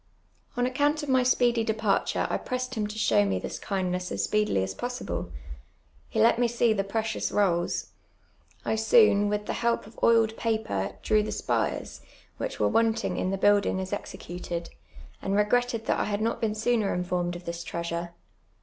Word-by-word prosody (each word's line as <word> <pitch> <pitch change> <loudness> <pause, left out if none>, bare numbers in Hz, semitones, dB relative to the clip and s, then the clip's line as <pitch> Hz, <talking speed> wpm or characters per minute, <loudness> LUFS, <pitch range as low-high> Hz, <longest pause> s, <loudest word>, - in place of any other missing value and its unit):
On 245 - +2
account 290 +4 +1
of 295 - -5
my 260 -1 +4
speedy 245 -2 +3
departure 215 -2 0
I - - -1
pressed 255 0 -4
him 215 -4 -1
to 210 +1 -7
show 110 - +3
me 95 -2 0
this 90 - -5
kindness 180 -2 -2
as - - -1
s])ec(lily 210 - +1
as 95 0 -3
possible. - - -4 0.8
lie 220 - +3
let 230 +1 +4
me 245 - +4
sec 235 -1 +2
the 195 - 0
precious 220 +2 -2
rolls; 175 -4 0 0.7
I - - +1
soon, 220 - +5
with 210 0 -1
the - - -2
help 235 0 0
of 215 - -14
oiled 225 -1 +4
paper, 220 - -1
drew 215 -1 +3
the 210 - -3
sj)ires, - - -2 0.4
which - - -4
were - - +3
wanting 225 0 +1
in 185 - 0
the 195 - -1
build 205 +1 +4
in«j 190 - 0
as 190 - -6
executed, 175 -3 -5 0.5
and 195 - -1
re'::iitted 230 +2 +1
that - - +1
I - - +1
had 205 -1 -1
not 230 +2 -1
been 215 -2 0
sooner 220 -2 +1
infonned 180 -1 -1
of 175 - -9
this 170 0 -5
treasure. 170 0 -4
210 Hz, 185 wpm, -27 LUFS, 180-230 Hz, 0.8 s, soon